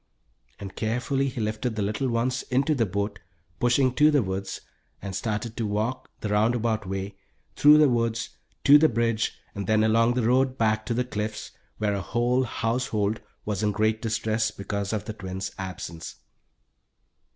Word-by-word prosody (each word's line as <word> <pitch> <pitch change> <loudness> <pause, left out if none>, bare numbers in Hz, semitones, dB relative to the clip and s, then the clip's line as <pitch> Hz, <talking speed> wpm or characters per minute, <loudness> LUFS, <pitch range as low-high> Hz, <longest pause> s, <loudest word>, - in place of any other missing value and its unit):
and 100 -1 -8
carefully 125 +5 0
he 125 - -6
lifted 110 +2 -2
the 110 - -2
little 110 +6 -1
ones 125 +2 0
into 135 +4 +2
the 120 -6 +1
boat, 100 +1 -3 0.4
pushing 125 +1 +3
to 150 +4 +5
the 145 -5 +3
woods, 95 0 -4 0.4
and 95 -1 -6
started 105 +2 -2
off - - -27
to 115 - -1
walk 110 +5 -2
the 105 - -3
round 105 +4 +3
about 110 -4 -1
way, 95 +1 -4 0.4
through 150 +1 +7
the 150 -1 +6
woods, 115 -2 0 0.3
to 145 +1 +8
the 160 +1 +5
bridge, 115 -1 0 0.2
then 110 +2 +1
along 115 +2 +3
the 125 - +1
road 130 +1 +2
back 110 -1 +1
to 120 - 0
the 125 +1 0
Cliffs, 105 -2 -4 0.3
where 105 -1 0
a 100 - -2
whole 120 +6 +1
household 115 -3 -1 0.2
was 105 -1 -2
in 105 -1 +2
great 110 +1 +1
distress 110 -1 0
because 100 -1 -4
of 105 -2 -2
the 110 - -5
twins' 95 -1 -5
absence. 90 -3 -6
110 Hz, 175 wpm, -26 LUFS, 105-125 Hz, 0.4 s, to